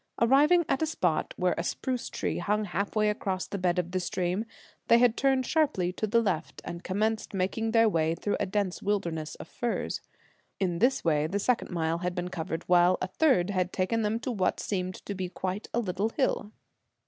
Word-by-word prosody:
Arriving 295 +9 +5
at 270 - 0
a 315 - +2
spot 180 - 0
where 180 0 +2
a - - -1
spruce 250 +6 -2
tree - - -2
hung 210 +1 0
half 200 +3 -3
way 215 0 +3
across 195 -3 -1
the 200 - -5
bed 180 -1 +1
of 175 -1 -1
the 185 - 0
stream, 180 +3 -1 0.4
they 235 - +7
had 240 -1 +4
turned 265 -1 +2
sharply 255 - +1
to 215 - -2
the 230 +3 +3
left, 175 -6 -2
and 170 0 -6
commenced 215 +2 -1
making 195 +4 0
their 225 0 +5
way 165 -4 +1
through 205 +4 -1
a - - 0
dense 195 -1 -1
wilderness 170 -7 -2
of - - -10
firs. 240 -1 -3 0.6
In 175 -3 0
this 250 +4 +2
way 155 -2 +2
the 195 - -2
second 235 +4 0
mile 165 -1 -1
had 180 0 -2
been 180 -1 -3
covered, 165 -1 -4
while 180 +1 +4
a - - -1
third 190 - +2
had 185 -2 0
taken 210 +5 0
them 215 +1 0
to 255 - -2
what 190 -5 0
seemed 185 -2 -2
to 200 - -3
be 185 -2 -4
quite 190 +3 -4
a 235 - 0
little 200 0 -1
hill. 225 -5 -1
195 Hz, 205 wpm, -28 LUFS, 180-225 Hz, 0.6 s, they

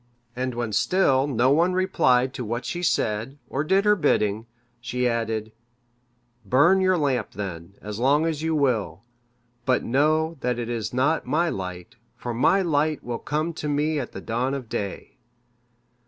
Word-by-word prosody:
And 130 0 -2
when 120 -3 -3
still 140 - +3
no 130 -1 +2
one 170 +5 +3
replied 135 -9 +2
to 125 - -5
what 120 +2 -3
she 175 - -3
said, 115 -4 0
or 140 - -2
did 190 +6 +2
her 210 0 +5
bidding, 110 - +1 0.3
she 125 +1 -1
added, 115 -2 -2 0.9
"Burn 145 - +4
your 185 -1 +3
lamp, 140 -5 -1
then, 90 -2 -6
as 105 +1 -6
long 145 +5 +3
as 160 -2 -2
you 160 0 0
will; 110 - 0 0.6
but 130 -1 +1
know, 155 +5 +1
that 125 -1 0
it 120 -1 -4
is 115 -2 -3
not 140 +6 +1
my 170 +3 +1
light, 90 - -6 0.2
for 120 - -4
my 190 +11 +3
light 155 -2 0
will 120 -1 -4
come 155 +3 -2
to 150 -2 -4
me 150 +1 0
at 125 - -5
the - - -8
dawn 125 +4 -1
of 130 -5 -7
day." 100 -2 -5
130 Hz, 170 wpm, -24 LUFS, 115-155 Hz, 0.9 s, her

